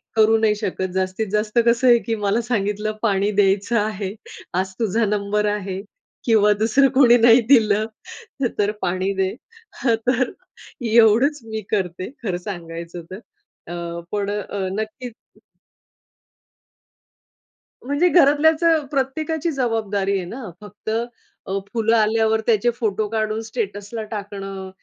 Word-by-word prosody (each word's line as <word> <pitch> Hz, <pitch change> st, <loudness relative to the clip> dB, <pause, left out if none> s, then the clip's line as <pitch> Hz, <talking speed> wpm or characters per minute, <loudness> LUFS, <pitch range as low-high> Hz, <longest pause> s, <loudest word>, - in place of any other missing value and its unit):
करू 220 Hz, 0 st, +5 dB
नाही 220 Hz, -1 st, +2 dB
शकत. 190 Hz, -3 st, -3 dB
जास्तीत 190 Hz, +3 st, -1 dB
जास्त 210 Hz, +2 st, -1 dB
कसं 240 Hz, +2 st, +3 dB
आहे 240 Hz, -, +7 dB
की 230 Hz, -1 st, -3 dB
मला 210 Hz, +2 st, 0 dB
सांगितलं 210 Hz, -2 st, -1 dB
पाणी 200 Hz, -2 st, +1 dB
द्यायचं 200 Hz, +4 st, +2 dB
आहे, 205 Hz, -2 st, -3 dB, 0.4 s
आज 190 Hz, +1 st, -1 dB
तुझा 225 Hz, +1 st, +1 dB
नंबर 210 Hz, 0 st, 0 dB
आहे 195 Hz, -2 st, -4 dB, 0.4 s
किंवा 210 Hz, -3 st, +4 dB
दुसरं 250 Hz, +5 st, +4 dB
कोणी 245 Hz, -3 st, +7 dB
नाही 235 Hz, +1 st, +6 dB
दिलं 215 Hz, -5 st, +4 dB, 0.7 s
तर 205 Hz, 0 st, +2 dB
पाणी 185 Hz, +2 st, -1 dB
दे. 190 Hz, -1 st, +1 dB, 0.5 s
हं, 235 Hz, -3 st, +3 dB
तर 255 Hz, 0 st, +2 dB, 0.5 s
एवढंच 230 Hz, +6 st, +4 dB
मी 220 Hz, -1 st, -5 dB
करते 185 Hz, -2 st, -2 dB
खरं 185 Hz, -5 st, -1 dB
सांगायचं 170 Hz, -2 st, -7 dB
तर 190 Hz, -, -7 dB, 0.5 s
अ, 175 Hz, -, -6 dB, 0.4 s
पण 205 Hz, -1 st, -1 dB
अ, 205 Hz, -2 st, -3 dB
नक्कीच 220 Hz, +3 st, -5 dB, 2.7 s
म्हणजे 285 Hz, +7 st, +2 dB
घरातल्याचं 320 Hz, 0 st, +4 dB
प्रत्येकाची 310 Hz, +4 st, -1 dB
जबाबदारी 215 Hz, -7 st, -1 dB
आहे 185 Hz, -, -4 dB
ना, 225 Hz, +2 st, -7 dB
फक्त 210 Hz, +1 st, -9 dB, 0.6 s
अ, 195 Hz, +1 st, -1 dB, 0.2 s
फुलं 225 Hz, 0 st, +2 dB
आल्यावर 220 Hz, 0 st, +2 dB
त्याचे 230 Hz, 0 st, +3 dB
फोटो 215 Hz, -2 st, -1 dB
काढून 220 Hz, 0 st, -1 dB
स्टेटसला 215 Hz, -1 st, -4 dB
टाकणं 195 Hz, -2 st, -6 dB
215 Hz, 125 wpm, -21 LUFS, 200-235 Hz, 2.7 s, आहे